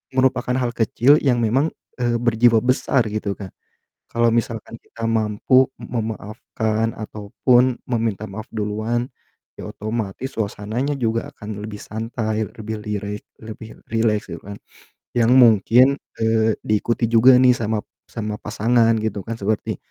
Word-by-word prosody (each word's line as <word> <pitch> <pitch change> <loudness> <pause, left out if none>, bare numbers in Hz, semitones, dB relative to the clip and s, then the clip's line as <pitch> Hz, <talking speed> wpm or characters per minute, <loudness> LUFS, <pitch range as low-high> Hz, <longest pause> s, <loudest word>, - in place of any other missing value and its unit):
merupakan 130 -1 +2
hal 120 -2 0
kecil 120 +5 +4
yang 125 -3 +3
memang, 130 +8 +2 0.3
eee, 120 -1 +1
berjiwa 115 -1 +4
besar 125 0 +2
gitu 105 -1 -2
Kak. 95 -2 -8 0.6
Kalau 115 0 +2
misalkan 115 -1 -2
kita 115 - -11
mampu 115 +4 +3
m - - -7
memaafkan 110 0 -2
ataupun 120 +4 +1
meminta 110 -4 -1
maaf 110 +3 -7
duluan, 110 +3 -2 0.5
ya - - -7
otomatis 110 +3 -4
suasananya 110 +6 -2
juga 115 +3 -1
akan 105 -4 -7
lebih 105 -1 -7
santai 110 0 -3
lebih 110 0 -5
lirek 105 0 -4 0.2
lebih 110 0 -9 0.2
rileks 115 -1 +1
gitu 85 - -8
kan 100 +1 -9 0.6
yang 120 +1 +4
mungkin, 125 +3 +6 0.2
eee, 110 -1 +2
diikuti 115 +3 0
juga 125 +3 +7
nih 125 -1 +7
sama 110 -1 -1 0.3
sama 105 -2 -4
pasangan 115 +2 +2
gitu 110 -2 -2
kan 115 - -4
seperti, 105 +1 -1
110 Hz, 135 wpm, -21 LUFS, 105-120 Hz, 0.6 s, juga